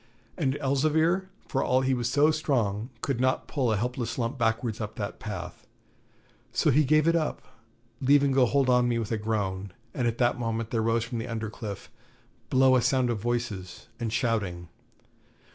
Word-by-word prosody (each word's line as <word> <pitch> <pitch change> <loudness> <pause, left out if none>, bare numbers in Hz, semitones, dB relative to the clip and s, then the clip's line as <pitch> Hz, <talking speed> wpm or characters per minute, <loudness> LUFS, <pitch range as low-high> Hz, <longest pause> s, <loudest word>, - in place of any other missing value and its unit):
And 140 -5 0
Elzevir, 155 +7 +2 0.2
for 135 -3 0
all 130 +1 +2
he 130 0 +1
was 120 -1 -1
so 145 +4 +4
strong, 120 -8 -1
could 135 -4 -1
not 130 +1 +1
pull 130 -5 0
a 110 - +1
helpless 120 +2 -3
lump 120 +2 -1
backwards 115 -2 -1
up 105 0 -5
that 100 -1 -5
path. 90 -5 -7 0.8
So - - +2
he 150 +4 +4
gave 155 +3 +3
it 165 - +4
up, 160 -2 -1 0.6
leaving 140 +1 +4
go 130 -2 +4
hold 135 +1 +2
on 125 -1 +4
me 120 - +1
with 115 -1 -3
a 110 - +1
groan, 100 -3 -2 0.2
and 125 -3 0
at 115 0 -1
that 120 0 +2
moment 115 -1 -2
there 115 - +1
rose 115 +1 +1
from 115 0 -4
the 115 - -4
under 110 -2 -4
cliff, 105 -3 -7 0.6
below 130 0 +5
a 125 - +4
sound 130 -1 +2
of 115 - -2
voices 115 -5 -4
and 115 -2 -2
shouting. 105 -8 -1
120 Hz, 185 wpm, -27 LUFS, 110-135 Hz, 0.8 s, below